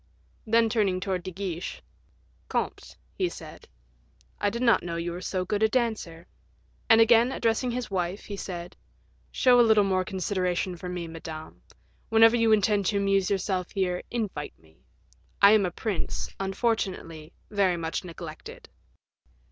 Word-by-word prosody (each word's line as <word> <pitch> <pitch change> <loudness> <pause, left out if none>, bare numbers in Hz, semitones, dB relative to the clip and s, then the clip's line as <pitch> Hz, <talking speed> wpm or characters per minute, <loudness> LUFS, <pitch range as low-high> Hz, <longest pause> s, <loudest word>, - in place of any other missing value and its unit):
Then 230 +1 +4
turning 205 -5 +1
towards 185 -2 -3
De 185 - -4
Guiche, 185 -2 -5 0.7
"Comte," - - -3 0.2
he 365 -2 -1
said, 155 - -11 0.7
"I 205 - +2
did 235 +4 -3
not 235 -2 +4
know 170 -1 -5
you 170 +1 -3
were 175 +1 -6
so 185 0 -2
good 205 +3 -1
a 220 - +4
dancer." 215 -9 -2 0.6
And, 225 -1 +7
again 230 +2 +5
addressing 235 0 0
his 245 -2 -4
wife, 180 +1 -2
he 205 - -6
said, 180 -2 -6 0.6
"Show 250 -1 +4
a - - +8
little 220 -3 +5
more 190 -1 +1
consideration 185 -2 -2
for 180 +1 -7
me, 180 -1 -4
Madame; 160 -1 -9 0.5
whenever 225 +1 +6
you 230 -1 +3
intend 205 -2 +3
to 205 - +1
amuse 195 -1 +2
yourselves 190 -2 -1
here, 185 -3 -1
invite 210 -11 -4
me. 80 -4 -26 0.6
I 200 - +8
am 210 -3 +4
a - - -5
prince, 200 0 -3
unfortunately, 190 -6 -2 0.2
very 195 -4 +2
much 165 +2 -3
neglected." 165 -3 -10
195 Hz, 155 wpm, -27 LUFS, 175-220 Hz, 0.7 s, a